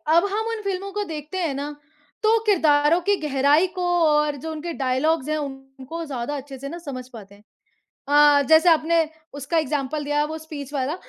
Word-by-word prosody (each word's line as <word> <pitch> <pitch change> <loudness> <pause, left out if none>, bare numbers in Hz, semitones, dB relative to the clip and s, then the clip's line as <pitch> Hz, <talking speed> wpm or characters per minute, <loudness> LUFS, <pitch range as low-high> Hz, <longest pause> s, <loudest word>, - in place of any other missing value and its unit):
अब 340 - +5
हम 440 +2 -1
उन 455 -1 -3
फ़िल्मों 395 0 -3
को 415 +1 -2
देखते 310 0 -6
हैं 330 -6 -1
ना, 290 +2 -5 0.5
तो 445 +1 +4
किरदारों 315 -4 +4
की 405 +3 +2
गहराई 290 +4 +3
को 365 - -2 0.2
और 300 -1 +2
जो 320 +4 -6
उनके 320 +2 -5
डायलॉग्स 275 +3 0
हैं 310 - 0
उनको 270 +2 -7
ज़्यादा 270 -1 -4
अच्छे 275 0 -9
से 275 +2 -7
ना 335 - -6
समझ 255 -6 -7
पाते 200 -3 -12
हैं। 205 - -22 0.7
अ, 290 0 +6
जैसे 320 +2 +6
आपने 325 0 +3 0.3
उसका 285 +4 -1
एग्ज़ाम्पल 295 0 -2
दिया 295 +1 +1
वो 310 +1 -5
स्पीच 300 -3 -8
वाला। 275 +2 -1
300 Hz, 190 wpm, -23 LUFS, 275-330 Hz, 0.7 s, अ